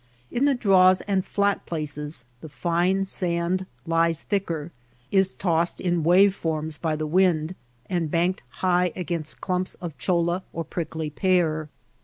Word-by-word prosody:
In 255 +4 +1
the 285 -1 +3
draws 185 -5 +5
and 195 -2 0
flat 200 +1 0
places 150 -4 -3
the 160 - -10
fine 175 +5 +1
sand 180 0 -1 0.2
lies 165 -1 +1
thicker, 170 -6 -2 0.4
is 190 -1 +3
tossed 170 -2 0
in 175 -2 0
wave 185 +4 +6
forms 160 -4 -3
by 160 -2 0
the 155 0 -3
wind, 170 -1 +2 0.3
and 170 -3 -1
banked 175 +4 +1 0.2
high 180 -1 +3
against 170 -4 -4
clumps 185 0 -2
of 170 -4 -7
cholla 175 0 +1
or 165 - -3
prickly 160 -2 -4
pear. 160 -4 +1
175 Hz, 145 wpm, -25 LUFS, 160-185 Hz, 0.4 s, wave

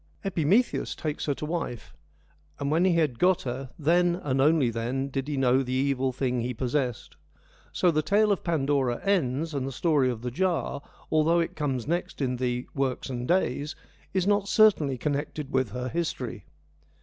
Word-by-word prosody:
Epimetheus 195 - +1
takes 155 -1 -4
her 145 - +1
to 150 - -5
wife, 125 - -4 0.6
and 140 0 -2
when 165 +4 +3
he 185 - +4
had 155 -8 +1
got 185 0 +3
her, 130 +1 -4
' - - -31
then 175 +2 +3
and 140 -7 -2
then - - +4
only 145 -4 +4 0.4
did 135 0 -3
he 150 -2 -2
know 130 0 +3
the 130 -1 -3
evil 135 0 +1
thing 125 -1 -1
he 125 +1 -3
possessed.' 125 -1 -2 0.5
So 180 - +2
the 155 -1 +1
tale 205 +6 +3
of 200 - 0
Pandora 140 -6 +1
ends, 160 -5 0
and 135 -2 -2
the - - -4
story 145 -1 +2
of 120 -2 -4
the 125 - -3
Jar, 170 -2 -1 0.3
although 160 +2 +3
it 165 - -2
comes 135 -6 -2
next 170 +3 -2
in 125 -3 -1
the 125 0 -1
' - - -34
Works 135 -1 -2
and 125 0 -4
Days,' 150 -4 0 0.4
is 190 -2 0
not 205 0 +2
certainly 175 - +4
connected 145 +1 -3
with 130 -3 +1
her 125 +4 -4
history. 125 - -3
140 Hz, 185 wpm, -27 LUFS, 130-170 Hz, 0.6 s, he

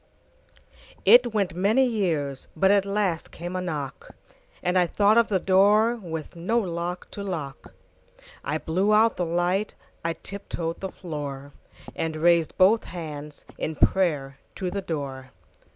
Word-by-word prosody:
IT 245 -1 +7
went 200 -4 0
many 215 +9 +3
years, 165 - -1
But 190 0 +4
at 200 -1 +3
last 195 -5 -1
came 175 +2 -7
a 185 - -1
knock, 150 -7 -5 0.5
And 180 +1 0
I 180 -1 +4
thought 205 +4 +3
of 235 -1 +5
the 195 -3 +1
doorWith 195 -3 +2
no 185 +8 0
lock 175 -3 -3
to 205 - -6
lock.I 155 -3 -7
blew 190 +7 +1
out 225 +1 +4
the 175 - -1
light,I 175 0 -2
tip 200 +4 -10
toed 165 -1 -3
the 190 - -4
floor, 145 -6 -6 0.4
And 160 -1 -2
raised 170 0 +2
both 200 +4 +5
handsIn 155 -1 -7
prayer 145 -8 +1 0.2
to 185 -2 -3
the 200 - -3
door. 140 -7 -5
180 Hz, 135 wpm, -25 LUFS, 160-200 Hz, 0.5 s, IT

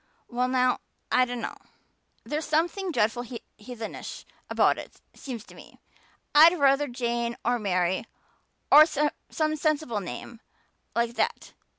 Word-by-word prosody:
"Well 250 +1 0
now, 255 -1 +2 0.3
I 255 - +5
dunno. 245 -1 -5 0.7
There's 305 +1 -3
something 345 +5 0
dreadful 225 -3 +1 0.4
heathenish 225 0 -7 0.2
about - - +3
it, - - -11
seems 245 -6 -7
to - - -16
me. - - -15 0.6
I'd 330 +3 +8
ruther 280 +1 +4
Jane 235 -1 -2
or 245 +1 +2
Mary 185 -1 0 0.7
or 305 +2 +10
some 310 +1 -1
sensible 305 -7 0
name 220 +4 -7 0.6
like 235 0 +1
that. - - -1
250 Hz, 120 wpm, -27 LUFS, 235-300 Hz, 0.7 s, or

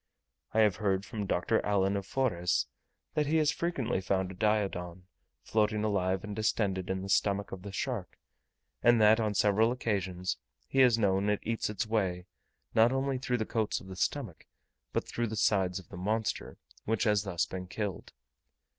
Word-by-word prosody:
I 110 - +3
have 105 -4 +3
heard 95 -1 0
from 105 -4 -4
Dr. 90 -1 +1
Allan 100 -1 +2
of 100 -1 -3
Forres, 95 -10 +1 0.5
that 150 -1 +1
he 160 +2 +2
has 155 -1 +3
frequently 130 - -1
found 95 0 0
a - - -7
Diodon, 95 -4 -1 0.4
floating 105 -1 +1
alive 95 -3 0
and 105 -1 -5
distended, 100 -4 0
in 95 0 -2
the - - -5
stomach 100 0 +1
of 95 - -6
the 100 +1 -7
shark, 110 -1 -3 0.6
and 120 -1 +5
that 110 +1 +6
on 105 -2 0
several 105 +3 +3
occasions 95 -7 -2 0.3
he 135 - 0
has 125 -3 +6
known 100 -1 +2
it 105 - +1
eat 115 -1 -1
its 105 +1 -2
way, 95 -5 -1 0.5
not 115 +2 +5
only 135 0 0
through 125 -1 0
the 110 - -1
coats 110 -1 -1
of 95 - -13
the 95 - -7
stomach, 110 - -3 0.4
but - - -1
through 120 0 -2
the 110 - -4
sides 95 -4 +2
of 95 - -10
the 100 - -9
monster, 110 +4 -2 0.3
which 110 0 +1
has 105 -3 +3
thus 90 -4 -1
been 90 -1 -6
killed. 100 -1 -4
105 Hz, 180 wpm, -31 LUFS, 95-115 Hz, 0.6 s, that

